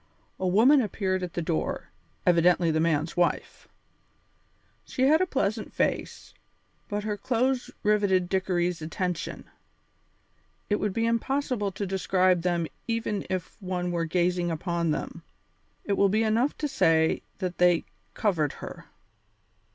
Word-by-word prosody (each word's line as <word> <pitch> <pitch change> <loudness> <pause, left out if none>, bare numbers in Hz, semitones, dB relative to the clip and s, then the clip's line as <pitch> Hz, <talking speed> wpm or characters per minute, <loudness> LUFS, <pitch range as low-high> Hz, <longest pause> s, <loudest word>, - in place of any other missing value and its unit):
A 185 - 0
woman 240 +10 +5
appeared 190 -4 -1
at 180 -2 -5
the 175 - -2
door, 80 - -2 0.3
evidently 175 -1 +4
the 155 - +1
man's 160 -1 0
wife. 175 -1 -1 1.2
She 260 - -2
had 310 +5 +5
a 370 - +2
pleasant 220 - -1
face, - - -2 0.5
but 205 0 -3
her 210 -1 -2
clothes 250 +4 0
riveted 200 -4 +2
Dickory's 180 -2 0
attention. 175 +2 -3 1.3
It 205 - +3
would 210 -1 -1
be 225 +4 0
impossible 230 -2 0
to 200 - -3
describe 185 -1 +2
them 175 -1 0 0.2
even 225 -3 -2
if 185 +3 -4
one 180 -1 -2
were 170 -1 -1
gazing 175 +1 +1
upon 170 0 -1
them. 150 - -3 0.6
It 200 - -1
will 200 0 +3
be 215 +3 +2
enough 230 +6 +1
to 300 - -1
say 160 - +2 0.2
that 185 -2 -4
they 175 -1 +4 0.3
covered 170 - +1
her. - - -9
185 Hz, 135 wpm, -27 LUFS, 175-215 Hz, 1.3 s, woman